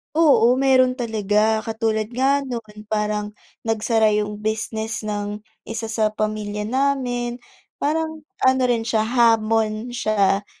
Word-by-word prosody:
Oo, 285 -7 +5
meron 255 -1 +4
talaga, 220 -2 0
katulad 220 -1 -1
nga 275 +3 +2
no'n 220 -4 -7
parang 210 -1 -2 0.3
nagsara 220 -1 +2
'yung 210 0 -1
business 220 0 -2
ng 210 -1 -4 0.2
isa 225 0 -5
sa 220 -1 0
pamilya 210 0 -3
namin. 250 -2 -1 0.4
Parang 315 +1 -1 0.2
ano 260 0 +4
rin 230 -2 +1
siya 225 -2 +1
hamon 225 -1 +2
siya 205 -4 +1
220 Hz, 120 wpm, -22 LUFS, 215-245 Hz, 0.4 s, Oo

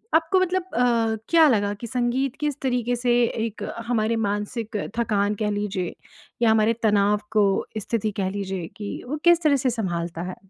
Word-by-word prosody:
आपको 325 +4 +3
मतलब 370 0 +1
अ, 230 -2 +2
क्या 330 -2 +6
लगा 205 -6 +2
कि 230 +3 -8
संगीत 250 +2 -1
किस 295 -2 -2
तरीके 245 -2 0
से 245 0 0
एक 225 -1 -3 0.2
हमारे 230 -1 +1
मानसिक 210 +1 -2 0.2
थकान 210 -3 +1
कह 210 0 -1
लीजिए 200 -4 -2 0.5
या 230 -2 +5
हमारे 220 +1 +3
तनाव 205 -1 +3
को 210 -2 +4 0.3
स्थिति 215 0 -2
कह 190 - 0
लीजिए 190 -3 -4
कि 205 -1 -6
वो 300 +4 -3
किस 345 -1 +5
तरह 295 -2 +4
से 260 -1 +1
सँभालता 175 -7 -3
है? 180 +1 -5
225 Hz, 170 wpm, -24 LUFS, 205-250 Hz, 0.5 s, क्या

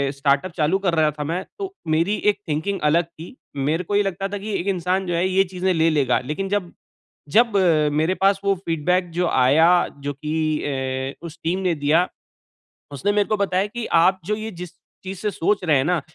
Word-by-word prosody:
Startup 140 +5 +1
चालू 160 +4 +2
कर 185 -4 0
रहा 155 -1 +3
था 150 0 -5
मैं, 170 +5 -2 0.2
तो 390 -1 -5
मेरी 165 +6 +2 0.2
एक 200 - -12
थिंकिंग 160 +7 -1
अलग 170 +3 +3
थी। 170 +6 -12 0.2
मेरे 150 +6 0
को 200 +4 -3
ये 205 - +4
लगता 195 0 -2
था 205 +1 -5
कि 210 +2 -5
एक 175 - -4
इंसान 185 0 0
जो 175 - -1
है 175 +2 +1
ये 190 +1 +3
चीज़े 185 0 0
ले 165 0 +3
लेगा। 140 -5 +2
लेकिन 175 +8 -3
जब 195 -4 -1 0.6
जब 230 -3 +4 0.4
मेरे 160 +4 +1
पास 195 0 +4
वो 200 0 +2
फीडबैक 175 +3 0
जो 175 +1 0
आया 140 +6 +4 0.4
जो 145 - -1
की 150 +2 -5 0.3
ए 130 -1 -3
उस 165 -1 -8
टीम 175 +3 0
ने 180 -3 0
दिया। 160 +5 +3 0.8
उसने 140 +9 -1
मेरे 205 0 +2
को 215 - +1
बताया 195 0 0
कि 235 +2 -5 0.2
आप 185 +2 +3
जो 210 +3 0
ये 220 +1 -6
जिस 180 -2 -8 0.3
चीज़ 190 0 -6
से 210 -1 -1
सोच 200 +3 0
रहे 155 -5 +3
हैं 130 - +1
ना 175 -1 +1
180 Hz, 210 wpm, -22 LUFS, 155-195 Hz, 0.8 s, ये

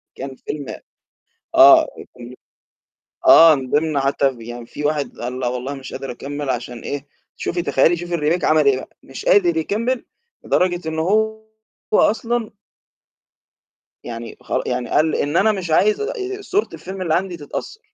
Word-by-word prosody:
كان 135 0 -7
فيلم 145 +2 -6 0.9
آه، 330 -1 +8 0.3
كان 120 0 -10 0.9
آه 165 -1 +9
من 130 -3 -5
ضمن 150 -1 +1
حتى 135 -1 +1
يعني 120 +1 -8
فيه 145 - -7
واحد 150 -1 -2
قال: 125 +2 -5
"لأ 125 - -1
والله 125 +3 -4
مش 135 -1 -9
قادر 135 - -6
أكمل" 145 +3 -5
عشان 120 -1 -4
إيه؟ 140 +3 -5 0.3
شوفي 175 0 -2
تخيلي 140 +3 +3
شوفي 175 0 -3
الRemake 165 +3 0
عمل 155 -2 +3
إيه 135 -2 +5
بقى، 130 - -10
مش - - -9
قادر 400 -9 +4
يكمل 245 -4 -1 0.4
لدرجة 175 -2 0
إن 160 0 -4
هو 220 +6 +1 0.5
أصلًا 230 +2 +2 1.5
يعني 115 -1 -7
خر - - -1
يعني 125 - -2
قال: 155 0 +2
"إن 145 +4 0
أنا 220 +2 +4
مش 185 -5 -4
عايز 425 - +3
آآ 445 +4 -2 0.3
صورة 405 +1 0
الفيلم 190 +1 -7
اللي 165 -4 0
عندي 180 0 -1
تتأثر" 165 - -7
160 Hz, 155 wpm, -20 LUFS, 135-210 Hz, 1.5 s, آه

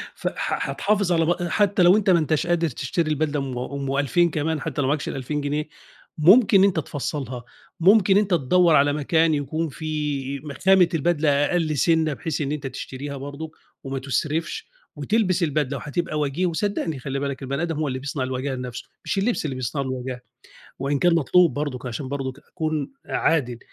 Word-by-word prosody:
ف - - -4
ح - - -2
حتحافظ 200 -3 0
على 165 -1 +3
بأ 175 +1 0
حتى 200 -3 +2
لو 180 +3 +7
أنت 210 -2 +1
ما 175 -2 +5
أنتاش 155 +1 0
قادر 170 -1 +2
تشتري 155 +6 -2
البدلة 150 -1 0
أم 130 -2 -4
أم 135 +2 -3
2000 170 +5 +2
كمان 155 0 -2
حتى 145 - -2
لو 130 - 0
ما - - +1
معاكش 150 0 -1
ال2000 145 +3 -3
جنيه، 150 +2 -2 0.5
ممكن 195 +4 +6
أنت 195 -4 +3
تفصّلها، 135 -4 -4 0.4
ممكن 195 +2 +5
أنت 205 -2 +1
تدوّر 170 +2 +4
على 145 0 +4
مكان 160 +2 +2
يكون 155 +2 -2
في 145 -2 -3
ما 145 0 -8
خامة 190 +4 +4
البدلة 160 -1 +1 0.2
أقل 160 -4 0
سِنَّة 160 0 +2
بحيث 160 +1 -3
إن 140 0 -2
أنت 145 -2 -3
تشتريها 140 +2 -6
برضه، 145 +3 -7 0.3
وما 135 -1 -4
تُسرفش، 155 - -2 0.3
وتلبس 200 -5 +1
البدلة 150 -3 0
وحتبقى 155 0 -3
وجيه، 150 +5 0
وصدقني 170 -4 -1
خلِّ 135 +1 -3
بالك 140 -1 -3
البَني 140 +3 -2
آدم 170 -1 -1
هو 150 0 -1
اللي 130 -1 -3
بيصنع 140 0 -3
الوجاهة 130 +1 -3
لنفسُه، 125 -1 -6 0.2
مش - - -2
الِلبس 205 -3 0
اللي 135 -3 -3
بيصنع 130 +3 -3
لُه 135 - -3
الوجاهة، 130 -1 -5 0.6
وإن 140 +1 0
كان 175 +2 +4
مطلوب 170 +2 +4
برضُك 145 -3 -4
عشان 125 +3 -4
برضُك 135 -1 -4
أكون 155 - -3
أ - - -12
عادل 125 -7 +1
150 Hz, 185 wpm, -23 LUFS, 135-170 Hz, 0.6 s, لو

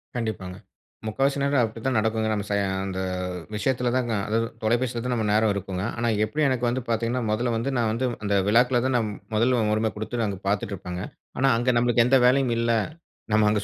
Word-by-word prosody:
கண்டிப்பாங்க. 100 -6 -4 0.5
முக்காவாசி 135 +5 0
நேரம் 140 -1 +2
அப்டிதான் 115 +3 -1
நடக்குங்க. 110 0 0
நம்ம 105 -1 -2
ச - - 0 0.3
அந்த 95 -1 -4 0.6
விஷயத்துல 125 +3 0
தாங்க. 120 -3 0
அதா 110 +2 +1 0.3
தொலைபேசியில 120 +2 0
தான் 125 - 0
நம்ம 110 -2 -1
நேரம் 110 0 +3
இருக்குங்க. 95 -1 -4
ஆனா, 120 0 0 0.2
எப்டியும் 150 +7 +1
எனக்கு 125 -2 0
வந்து 125 +2 -1
பார்த்தீங்கன்னா 115 +2 0
மொதல்ல 120 +2 0
வந்து, 125 +5 -1
நான் 115 -2 +1
வந்து 115 +4 -1 0.2
அந்த 100 -1 +1
விழாக்கள்தான் 125 +3 +3
நான் 110 -3 -1 0.2
முதல்ல 120 +3 +3
உரிம 110 0 +1
குடுத்து 115 +2 -2
அங்க 100 -2 -4
பார்த்துட்டு 100 0 0
இருப்பேங்க. 90 -1 -6 0.4
ஆனா, 135 +1 +4
அங்க 120 +2 +2
நம்மளுக்கு 120 0 +3
எந்த 135 +1 +5
வேலையும் 130 -1 +3
இல்ல. 115 0 +1 0.6
நம்ம 110 -1 +4
அங்க 105 -1 +1
115 Hz, 185 wpm, -25 LUFS, 105-125 Hz, 0.6 s, எந்த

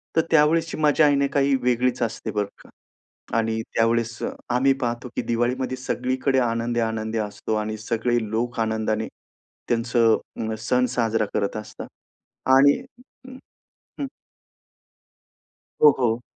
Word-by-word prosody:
तर 160 - +5
त्यावेळेसची 160 +1 +3
मजा 155 0 +4
आहे 145 - +4
ना, 140 0 +2
काही 140 -1 +3
वेगळीच 125 0 +1
असते, 115 - -3
बरं 105 -1 -1 0.2
का. - - -18 0.7
आणि 110 0 0
त्यावेळेस 115 0 +1 0.3
आम्ही 130 +3 +3
पाहतो 120 0 -2
की - - 0
दिवाळीमध्ये 125 +2 -1
सगळीकडे 130 +1 0
आनंदी, 120 0 0
आनंद 110 -1 -2
असतो 105 0 -3
आणि 110 0 -2
सगळे 115 +2 0
लोक 115 +2 -2
आनंदाने 110 0 0 0.6
त्यांचं 115 -1 +3 0.3
अ, - - -2
सण 125 +2 +2
साजरा 115 -2 +1
करत 100 -1 -1
असतात. 105 - -8 0.6
आणि 140 - +6 1.2
हं. 280 - -2 1.7
हो, 150 - +9
हो. 120 -1 +1
120 Hz, 125 wpm, -24 LUFS, 110-130 Hz, 1.7 s, हो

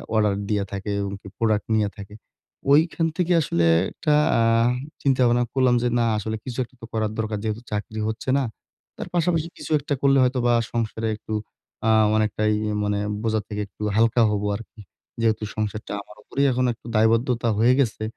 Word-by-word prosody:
Order 105 -2 +3 0.2
দিয়া 105 -2 +1
থাকে 100 +1 -4
এবং 100 0 -3
কি - - -12
প্রোডাক্ট 110 -2 +1
নিয়া 105 -2 +2
থাকে। 100 +1 -10 0.6
ঐখান 165 +2 +3
থেকে 180 0 0
আসলে 85 - +1 0.3
একটা 150 - 0 0.3
আ - - +3 0.6
চিন্তা 135 -2 +2
ভাবনা 120 0 +3
করলাম 130 -2 +3
যে - - +2
না 115 - +2
আসলে 110 +1 -3
কিছু 125 -1 -6
একটা 125 - -15
তো - - -7
করার 110 -1 0
দরকার। 110 -1 -1
যেহেতু 110 +1 -2
চাকরি 105 +1 -4
হচ্ছে 110 +4 -5
না। 140 - +1 0.5
তার - - -5
পাশাপাশি 165 -1 +1
কিছু - - -8
একটা 145 +1 -3
করলে 140 0 +4
হয়তোবা 125 -1 +2 0.2
সংসারে 115 -1 -2
একটু 110 0 -8 0.5
আ - - +4 0.3
অনেকটাই 110 0 +1 0.3
মানে 105 0 0
এ - - -3
বোঝার 110 -2 0
থেকে 105 0 -3
একটু 105 - -18
হালকা 115 +1 +3
হবো 105 0 -1
আরকি। 115 -1 -14 0.4
যেহেতু 110 -1 +1
সংসারটা 105 -1 -3
আমার 105 - -16
উপরেই, 140 +1 0
এখন 125 +1 +1
একটু 115 - -24
দায়বদ্ধতা 115 +2 +2
হয়ে 120 +3 +5
গেছে। 110 -4 0
110 Hz, 180 wpm, -23 LUFS, 105-125 Hz, 0.6 s, হয়ে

